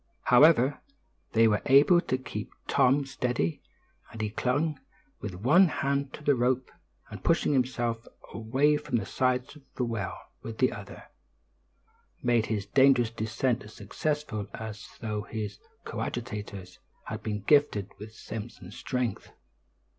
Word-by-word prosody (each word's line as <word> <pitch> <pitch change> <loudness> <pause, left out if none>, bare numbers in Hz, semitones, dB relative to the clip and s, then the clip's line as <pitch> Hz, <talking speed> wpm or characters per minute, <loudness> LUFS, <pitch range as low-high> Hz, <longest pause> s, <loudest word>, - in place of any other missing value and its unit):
However, 140 +1 +5 0.5
they 115 0 +5
were 105 -1 +2
able 145 +6 +6
to 130 - -1
keep 130 - -6 0.2
Tom 135 +2 +3
steady, 125 -11 -1 0.5
and 115 - -10
he, 105 -1 -2
clinging 145 +7 0 0.4
with 95 -4 -6
one 150 - +5
hand 140 -2 -1
to 150 - -13
his 145 - +4
rope, 125 +1 0 0.4
and - - -9
pushing - - +2
himself 120 -3 -1 0.3
away 135 +7 +2
from 140 -5 -2
the 105 - -3
sides 130 +4 0
of 150 - -14
the 125 - 0
well 115 -5 -3 0.2
with 115 -1 -7
the 130 - +3
other, - - -9 1.2
made 120 -3 +2
his 105 -3 -2
dangerous 130 0 +4
descent 115 +3 -1
as 110 -1 -12
successfully 125 0 -3
as 110 -2 -7
though 105 -2 -2
his 110 0 -5 0.3
coadjutors 105 -6 -5 0.3
had - - -5
been 105 -1 -3
gifted 110 -8 +3
with 105 +1 -9
Samson's 105 -5 -8
strength. 125 -5 -3
120 Hz, 140 wpm, -28 LUFS, 110-135 Hz, 1.2 s, able